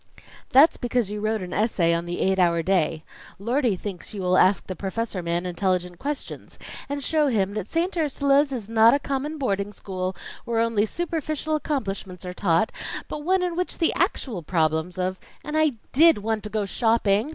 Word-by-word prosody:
"That's 285 Hz, +5 st, +6 dB
because 240 Hz, -4 st, -1 dB
you 210 Hz, 0 st, -4 dB
wrote 215 Hz, -2 st, -1 dB
an 180 Hz, -, -6 dB
essay 190 Hz, -6 st, +2 dB
on 170 Hz, 0 st, -1 dB
the 175 Hz, -, -3 dB
'Eight 190 Hz, 0 st, +2 dB
Hour 170 Hz, -2 st, +3 dB
Day.' 165 Hz, -3 st, +1 dB, 0.3 s
Lordie 235 Hz, +1 st, +1 dB
thinks 195 Hz, +1 st, -7 dB
you 195 Hz, -, -4 dB
will 180 Hz, 0 st, +2 dB
ask 185 Hz, 0 st, +4 dB
the 185 Hz, -, -5 dB
professor 200 Hz, +1 st, -3 dB
man 170 Hz, +1 st, -2 dB
intelligent 180 Hz, -1 st, -1 dB
questions; 285 Hz, +1 st, -5 dB, 0.3 s
and 285 Hz, 0 st, -3 dB
show 305 Hz, +1 st, +2 dB
him 200 Hz, -6 st, +1 dB
that 215 Hz, -1 st, -4 dB
St. 345 Hz, +3 st, 0 dB
Ursula's 285 Hz, -2 st, +2 dB
is 235 Hz, -6 st, -4 dB
not 225 Hz, +2 st, +5 dB
a -, -, 0 dB
common 280 Hz, +2 st, -3 dB
boarding 200 Hz, -7 st, -1 dB
school 185 Hz, -2 st, -4 dB, 0.3 s
where 230 Hz, -1 st, -1 dB
only 225 Hz, -2 st, +2 dB
superficial 315 Hz, 0 st, -2 dB
accomplishments 195 Hz, -, -3 dB
are 180 Hz, -, -5 dB
taught, 180 Hz, +1 st, +1 dB, 0.4 s
but 300 Hz, -, -5 dB
one 370 Hz, +3 st, +2 dB
in 355 Hz, -2 st, -1 dB
which 360 Hz, +1 st, -2 dB
the 330 Hz, -, +2 dB
actual 270 Hz, -, -1 dB
problems 160 Hz, +1 st, 0 dB
of 185 Hz, 0 st, -2 dB
" -, -, -27 dB
"And 300 Hz, +1 st, -4 dB
I 310 Hz, -2 st, +3 dB, 0.2 s
did 320 Hz, +3 st, +6 dB
want 215 Hz, +1 st, -2 dB
to -, -, -4 dB
go 210 Hz, -1 st, -1 dB
shopping!" 225 Hz, +2 st, +2 dB
215 Hz, 190 wpm, -24 LUFS, 185-280 Hz, 0.4 s, That's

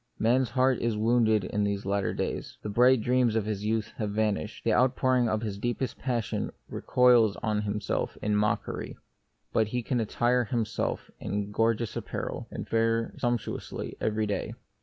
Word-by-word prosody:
Man's 125 Hz, +3 st, +2 dB
heart 130 Hz, 0 st, +2 dB
is 115 Hz, -2 st, 0 dB
wounded 110 Hz, -2 st, +3 dB
in 105 Hz, +3 st, -1 dB
these 100 Hz, -1 st, -1 dB
latter 100 Hz, -1 st, 0 dB
days; -, -, -4 dB
the 105 Hz, -, -3 dB
bright 125 Hz, +3 st, +5 dB
dreams 125 Hz, -1 st, +2 dB
of 110 Hz, -2 st, +1 dB
his 105 Hz, -2 st, -3 dB
youth 110 Hz, 0 st, -1 dB
have 105 Hz, -2 st, -2 dB
vanished; 105 Hz, -5 st, -1 dB
the -, -, +2 dB
outpouring 125 Hz, -1 st, +3 dB
of 110 Hz, +1 st, -1 dB
his 100 Hz, -2 st, -4 dB
deepest 120 Hz, +2 st, -2 dB
passion 120 Hz, -5 st, -1 dB, 0.2 s
recoils 120 Hz, -4 st, +4 dB
on 105 Hz, -2 st, +1 dB
himself 105 Hz, -1 st, -2 dB
in 105 Hz, 0 st, 0 dB
mockery; 105 Hz, 0 st, -1 dB, 0.6 s
but 110 Hz, -1 st, +3 dB
he 125 Hz, +2 st, -2 dB
can 125 Hz, +1 st, 0 dB
attire 120 Hz, +3 st, +1 dB
him 115 Hz, 0 st, 0 dB
self 110 Hz, -, -3 dB
in 105 Hz, 0 st, -3 dB
gorgeous 115 Hz, 0 st, +1 dB
apparel, -, -, -4 dB
and -, -, -6 dB
fare 115 Hz, 0 st, +1 dB
sumptuously 120 Hz, -2 st, -3 dB
every 110 Hz, 0 st, 0 dB
day. 105 Hz, -1 st, -3 dB
110 Hz, 165 wpm, -28 LUFS, 105-120 Hz, 0.6 s, bright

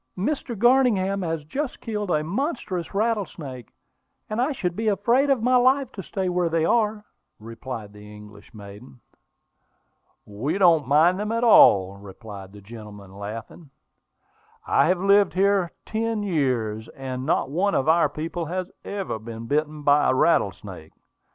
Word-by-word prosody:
Page 185 Hz, -, -2 dB
280.] 270 Hz, -4 st, -2 dB
"Mr. -, -, -11 dB
Garningham 220 Hz, -6 st, +3 dB
has 165 Hz, -3 st, -3 dB
just 265 Hz, -, -4 dB
killed 210 Hz, -4 st, -4 dB
a 155 Hz, -3 st, +1 dB
monstrous 195 Hz, -, -3 dB
rattlesnake; 185 Hz, -, -3 dB, 0.6 s
and 215 Hz, +3 st, -1 dB
I 265 Hz, +5 st, +1 dB
should 180 Hz, -10 st, -3 dB
be 225 Hz, +2 st, -3 dB
afraid 235 Hz, +8 st, +2 dB
of 265 Hz, -5 st, +1 dB
my 255 Hz, +1 st, +3 dB
life 260 Hz, +1 st, +2 dB
to 195 Hz, -, -7 dB
stay 190 Hz, 0 st, -4 dB
where 180 Hz, -1 st, 0 dB
they 165 Hz, -1 st, +1 dB
are," 215 Hz, 0 st, +1 dB, 0.3 s
replied 115 Hz, -1 st, -8 dB
the 105 Hz, 0 st, -13 dB
English 105 Hz, -1 st, -14 dB
maiden. 105 Hz, +3 st, -13 dB, 1.3 s
"We 110 Hz, -, -3 dB
don't 165 Hz, -8 st, +4 dB
mind 160 Hz, +7 st, +4 dB
them 210 Hz, +1 st, -3 dB
at 230 Hz, +1 st, -1 dB
all," 100 Hz, -, +6 dB
replied 100 Hz, 0 st, -11 dB
the 105 Hz, 0 st, -13 dB
gentleman, 105 Hz, -2 st, -12 dB
laughing. 110 Hz, -, -8 dB, 1.0 s
"I -, -, +3 dB
have 180 Hz, +2 st, +2 dB
lived 200 Hz, +1 st, +3 dB
here 195 Hz, -2 st, +2 dB
ten 220 Hz, -1 st, -2 dB
years, 125 Hz, -, -1 dB
and 130 Hz, -1 st, -6 dB
not 135 Hz, -2 st, 0 dB
one 195 Hz, +6 st, 0 dB
of 135 Hz, -, 0 dB
our 160 Hz, -1 st, +4 dB
people 165 Hz, +3 st, -5 dB
has 185 Hz, +2 st, -4 dB
ever 195 Hz, -, -4 dB
been 115 Hz, +1 st, -8 dB
bitten 150 Hz, +3 st, -2 dB
by 145 Hz, +1 st, +4 dB
a 130 Hz, -, +2 dB
rattlesnake. 95 Hz, -, 0 dB
165 Hz, 155 wpm, -24 LUFS, -, 1.3 s, all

